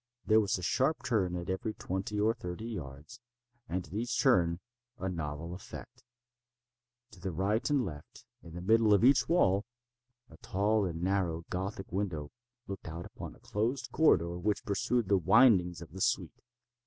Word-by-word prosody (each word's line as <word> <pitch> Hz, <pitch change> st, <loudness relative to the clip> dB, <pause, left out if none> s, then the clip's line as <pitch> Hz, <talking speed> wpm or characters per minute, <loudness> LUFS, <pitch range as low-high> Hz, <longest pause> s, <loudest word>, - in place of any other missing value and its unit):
There 110 Hz, 0 st, +5 dB
was 100 Hz, -3 st, +1 dB
a 90 Hz, -, -7 dB
sharp 135 Hz, -, +1 dB
turn 95 Hz, -7 st, 0 dB
at 85 Hz, 0 st, -5 dB
every 100 Hz, +3 st, -2 dB
twenty 95 Hz, +3 st, -3 dB
or 110 Hz, +2 st, +3 dB
thirty 90 Hz, -2 st, -6 dB
yards, 80 Hz, -, -7 dB, 0.5 s
and 90 Hz, +1 st, -2 dB
at 75 Hz, -, -14 dB
each 115 Hz, +4 st, -1 dB
turn 85 Hz, -, +3 dB, 0.4 s
a 95 Hz, -, -3 dB
novel 80 Hz, -1 st, -4 dB
effect. 90 Hz, -, -10 dB, 1.1 s
To 105 Hz, -, -15 dB
the 95 Hz, -, -3 dB
right 105 Hz, -, 0 dB
and 140 Hz, -4 st, +2 dB
left, 75 Hz, -4 st, -9 dB, 0.2 s
in 85 Hz, -1 st, -12 dB
the 90 Hz, -, -6 dB
middle 110 Hz, +1 st, +5 dB
of 100 Hz, -, +2 dB
each 135 Hz, +4 st, +5 dB
wall, 100 Hz, -, +3 dB, 0.6 s
a 80 Hz, -, -16 dB
tall 105 Hz, +4 st, +1 dB
and 85 Hz, -1 st, -5 dB
narrow 90 Hz, -4 st, 0 dB
Gothic 95 Hz, +2 st, -4 dB
window 90 Hz, -6 st, -3 dB, 0.3 s
looked 95 Hz, -4 st, -7 dB
out 85 Hz, +1 st, -6 dB
upon -, -, -9 dB
a -, -, -20 dB
closed 115 Hz, +6 st, -2 dB
corridor 85 Hz, -, +3 dB
which 105 Hz, +3 st, -1 dB
pursued 110 Hz, +2 st, 0 dB
the 100 Hz, -1 st, +3 dB
windings 90 Hz, -3 st, +4 dB
of 80 Hz, -, -14 dB
the 95 Hz, +2 st, -8 dB
suite. -, -, 0 dB
95 Hz, 170 wpm, -31 LUFS, 85-110 Hz, 1.1 s, There